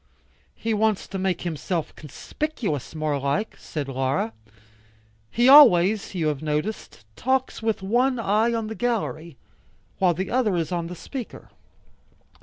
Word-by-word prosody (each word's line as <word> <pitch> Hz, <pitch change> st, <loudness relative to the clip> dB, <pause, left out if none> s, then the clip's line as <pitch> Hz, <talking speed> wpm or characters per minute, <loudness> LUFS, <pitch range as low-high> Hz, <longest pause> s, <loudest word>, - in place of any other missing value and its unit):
"He 225 Hz, 0 st, -2 dB
wants 215 Hz, -1 st, +1 dB
to 195 Hz, -, -5 dB
make 190 Hz, -1 st, -1 dB
himself 170 Hz, 0 st, -3 dB
conspicuous 160 Hz, -, -5 dB
more 155 Hz, -2 st, -1 dB
like," 140 Hz, +10 st, -2 dB
said 150 Hz, -3 st, -5 dB
Laura. 130 Hz, -3 st, -1 dB, 1.0 s
"He 240 Hz, -, +2 dB
always, 215 Hz, -9 st, +7 dB
you 170 Hz, -3 st, -1 dB
have 145 Hz, -3 st, -3 dB
noticed, 150 Hz, -, -4 dB
talks 260 Hz, -, -1 dB
with 220 Hz, -3 st, -1 dB
one 250 Hz, +6 st, +2 dB
eye 220 Hz, +1 st, +1 dB
on 230 Hz, -1 st, -1 dB
the 220 Hz, -, -5 dB
gallery, 215 Hz, -, -3 dB, 0.6 s
while 180 Hz, -3 st, +3 dB
the 190 Hz, +3 st, -4 dB
other 235 Hz, -6 st, +1 dB
is 165 Hz, -1 st, -2 dB
on 170 Hz, -2 st, -2 dB
the 180 Hz, -, -7 dB
speaker." 250 Hz, -, -8 dB
190 Hz, 140 wpm, -24 LUFS, 155-230 Hz, 1.0 s, always